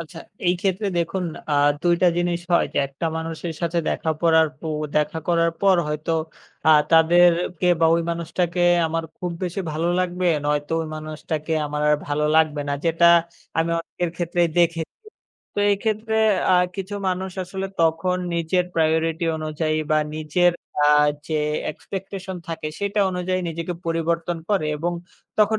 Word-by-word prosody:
আচ্ছা, 165 0 -9 0.3
এই 175 - +4
ক্ষেত্রে 195 +2 0
দেখুন 180 +2 -1 0.3
আ - - +1 0.3
২ 175 -1 +4
টা - - +6
জিনিস 175 0 0
হয় 170 - +4
যে - - +1
একটা 135 +5 -7
মানুষের 165 +1 -4
সাথে 170 0 0
দেখা 160 - -1
করার 160 -1 +5
প - - -44 0.4
দেখা 150 +2 +1
করার 170 -1 +3
পর 195 -2 +5
হয়তো 150 +2 -2 0.5
আ - - +7 0.2
তাদেরকে 175 +1 +4
বা 165 - +5
ওই 170 - +1
মানুষটাকে 170 +1 -1 0.2
আমার 165 +1 -2
খুব 180 -1 -4
বেশি 180 +3 -3
ভালো 165 +3 -1
লাগবে 180 0 -1 0.2
নয়তো 145 +1 -1
ওই - - -5
মানুষটাকে 155 0 -4
আমার 150 0 -3
আর 150 - +4
ভালো 150 +1 0
লাগবে 155 -2 +3
না - - 0
যেটা 165 +1 +3 0.5
আমি 165 +1 +1
অনেকের 170 0 -4
ক্ষেত্রেই 175 0 +1
দেখেছি। 165 -1 +1 0.6
তো - - -4
এই 200 - +3
ক্ষেত্রে 220 0 -1 0.4
আ - - +6 0.2
কিছু 195 +1 -5
মানুষ 185 +1 -2
আসলে 190 +2 -4
তখন 165 +3 +2 0.2
নিজের 170 +2 +1
প্রায়োরিটি 160 +1 +1
অনুযায়ী 155 0 -2
বা 155 - +4 0.2
নিজের 155 +3 +2 0.3
আ - - +5 0.4
যে 155 - 0 0.3
এক্সপেকটেশন 190 +2 -7
থাকে 160 -2 -4
সেটা 200 +1 0
অনুযায়ী 185 0 -1
নিজেকে 170 +2 -4
পরিবর্তন 165 +1 -1
করে 190 -7 +1
এবং 175 +3 -2 0.5
তখন 215 +1 +4
170 Hz, 155 wpm, -23 LUFS, 160-180 Hz, 0.6 s, আ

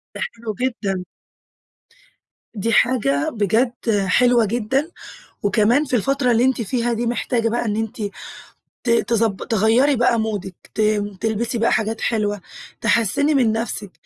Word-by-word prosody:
ده - - -6
حلو 225 -2 -6
جدًا. 200 -8 -2 1.5
دي 230 +1 -1
حاجة 210 - +2
بجد 225 +4 +1 0.3
حلوة 245 +4 +4
جدًا، 245 - -1 0.5
وكمان 225 +8 +3
في 255 - -1
الفترة 255 +2 +1
اللي 235 +1 +3
أنتِ 260 -2 +1
فيها 235 +2 -1
دي 235 +1 -2
محتاجة 235 -1 0
بقى 240 +1 -1
إن 210 -2 -1
أنتِ 220 0 -4 0.8
ت 245 - -2
تضب 230 -3 +1
تغيري 230 +6 +3
بقى 235 -1 +2
مودِك 205 -4 -3 0.2
ت - - 0 0.4
تلبسي 225 +2 -1
بقى 230 +1 +2
حاجات 220 +1 -1
حلوة، 205 -3 -1 0.4
تحسِّني 235 +7 +2
من 240 -5 +3
نفسك. 215 -3 -3
230 Hz, 135 wpm, -21 LUFS, 215-245 Hz, 1.5 s, حلوة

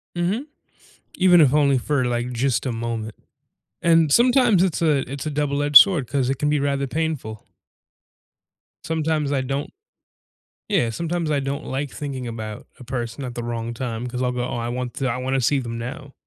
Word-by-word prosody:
Mhm. 185 +10 -1 0.7
Even 180 -2 +5
if 140 -3 +4
only 140 -3 +4
for, 140 +2 0
like, 120 0 -1
just 120 -1 0
a 130 - -1
moment. 115 -2 -4 0.7
And 165 -3 +4
sometimes 240 - +4
it's 180 -4 -1
a 150 -6 +1
it's 140 +2 -5
a 155 - -2
double-edged 145 0 +4
sword, 175 - +6
'cause 135 -1 0
it 135 - -1
can 150 - 0
be 150 0 +2
rather 140 -1 -1
painful. 145 -8 -3 1.4
Sometimes 155 -2 -1
I 140 -2 +1
don't 135 +2 -3 1.0
Yeah, 185 - +2
sometimes 165 +5 -2
I 145 - +2
don't 140 +2 -4
like 135 +1 -3
thinking 135 -4 -5
about 110 -2 -7
a - - -10
person 120 +1 -4
at 125 -1 -7
the 120 - -4
wrong 115 0 -4
time, 120 -1 -4
'cause 125 0 -4
I'll 125 -1 +1
go, 125 0 -2
"Oh, - - -4
I 115 0 -3
want 125 0 -4
to 135 -2 -1
I 120 - -2
wanna 130 +1 -1
see 140 +3 +2
them 115 -2 -5
now." 135 +4 -7
135 Hz, 190 wpm, -22 LUFS, 120-150 Hz, 1.4 s, sword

